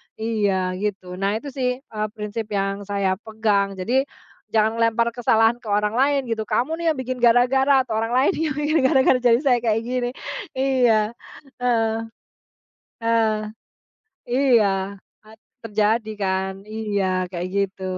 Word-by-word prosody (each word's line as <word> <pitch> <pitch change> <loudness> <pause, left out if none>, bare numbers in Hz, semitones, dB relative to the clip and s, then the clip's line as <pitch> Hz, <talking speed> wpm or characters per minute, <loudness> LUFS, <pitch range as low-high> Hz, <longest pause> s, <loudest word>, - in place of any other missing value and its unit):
Iya 205 -5 0
gitu, 190 -3 -4
nah 200 +2 0
itu 280 +6 -5
sih, 255 -1 -1
eee, 215 -5 -4
prinsip 210 +1 -5
yang 195 0 -2
saya 195 -2 0
pegang 215 -3 0
jadi, 250 +9 0 0.4
jangan 220 +1 +1
ngelempar 230 +1 +2
kesalahan 230 -1 +2
ke - - -13
orang 210 +1 +1
lain 275 +2 +2
gitu 225 -2 -2
kamu 245 +7 -1
nih - - -3
yang 310 - 0
bikin 255 0 -3
gara-gara 260 +3 +4
orang 225 -1 -2
lain 255 +3 +3
yang 310 -3 -2
bikin 300 +1 +1
gara-gara 265 -1 +4
jadi 240 -1 +5
saya 250 -3 +4
kayak 225 -1 +1
gini. 245 0 -1 0.5
Iya, 245 -5 +2 0.5
heeh. 230 -3 +2 1.0
Heeh. 230 -1 +1 0.9
iya 250 -4 +4 0.6
a - - -15 0.3
terjadi 220 +1 0
kan 190 0 0 0.2
iya 210 -3 -1 0.2
kayak 175 0 -4
gitu, 195 -1 -1
225 Hz, 140 wpm, -22 LUFS, 210-250 Hz, 1.0 s, jadi